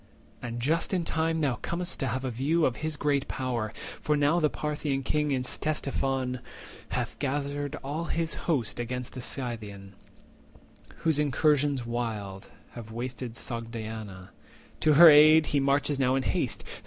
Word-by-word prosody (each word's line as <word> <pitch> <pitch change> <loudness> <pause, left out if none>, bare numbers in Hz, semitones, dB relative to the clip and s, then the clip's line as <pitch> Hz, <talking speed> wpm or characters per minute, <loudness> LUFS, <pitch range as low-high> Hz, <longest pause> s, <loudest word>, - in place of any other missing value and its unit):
And 120 0 -5
just 160 +9 +1
in 175 -2 -1
time 160 0 0
thou 135 -5 +1
com'st 175 +1 -3
to 135 - -1
have 130 +3 -2
a 130 - -2
view 150 +7 +1
Of 125 - 0
his 155 -1 -3
great 145 -2 0
power; 120 -5 -2 0.3
for 150 -1 +1
now 145 +4 +3
the 155 -2 +3
Parthian 145 -3 -2
king 150 +2 0
In 130 -2 0
Ctesiphon 135 -3 -1 0.5
hath - - -3
gathered 145 +1 -2
all 150 +5 -3
his 165 -1 0 0.2
host 130 -10 0
300 120 - -1
Against 125 +1 -5
the 130 - -6
Scythian, 105 -7 -5 1.1
whose 160 -3 +3
incursions 145 -2 +2
wild 110 -5 -4 0.2
Have 115 -2 -9
wasted 120 +1 -5
Sogdiana; 110 -5 -5 0.5
to 155 - +4
her 170 +4 +10
aid 155 +1 +8
He 145 - +1
marches 140 +1 +1
now 130 -1 +3
in 135 - 0
haste. - - -1
135 Hz, 155 wpm, -28 LUFS, 120-150 Hz, 1.1 s, her